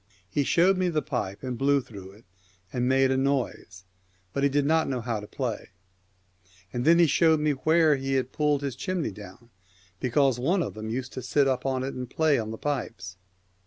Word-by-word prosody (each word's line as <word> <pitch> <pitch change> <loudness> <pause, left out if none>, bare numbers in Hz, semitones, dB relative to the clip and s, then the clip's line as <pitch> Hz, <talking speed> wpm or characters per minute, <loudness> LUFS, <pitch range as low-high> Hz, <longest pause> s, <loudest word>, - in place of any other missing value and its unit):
He 145 +8 0
showed 185 +6 +3
me 185 -1 +1
the 155 -3 -1
pipe, 105 -6 -4
and 125 -2 -4
blew 140 +1 +3
through 100 -7 -11
it, 105 +3 -19 0.5
and 125 0 0
made 135 0 +3
a 130 - +1
noise, 130 -9 -2 0.5
but 140 - -1
he 140 - +3
did 140 +1 +1
not 160 +1 +2
know 130 -2 -1
how 115 -2 -3
to 105 - -9
play; 120 -4 -4 1.0
and 120 0 -2
then 165 +2 +6
he 170 - +6
showed 160 +1 +3
me 150 0 +1
where 155 +2 +3
he 135 0 -3
had 130 -1 -1
pulled 150 -2 +1
his 135 -4 -3
chimney 180 - -2
down, 105 +4 -13 0.5
because 130 0 +2
one 170 +8 +1
of - - -5
them 110 0 -6
used 130 +3 -4
to 130 - -5
sit 140 +2 +2
up 130 0 -1
on 130 -1 -1
it 135 - -4
and 125 -1 -6
play 155 -2 +2
on 110 -1 -4
the 110 - -6
pipes. 95 -11 -4
135 Hz, 210 wpm, -26 LUFS, 120-150 Hz, 1.0 s, then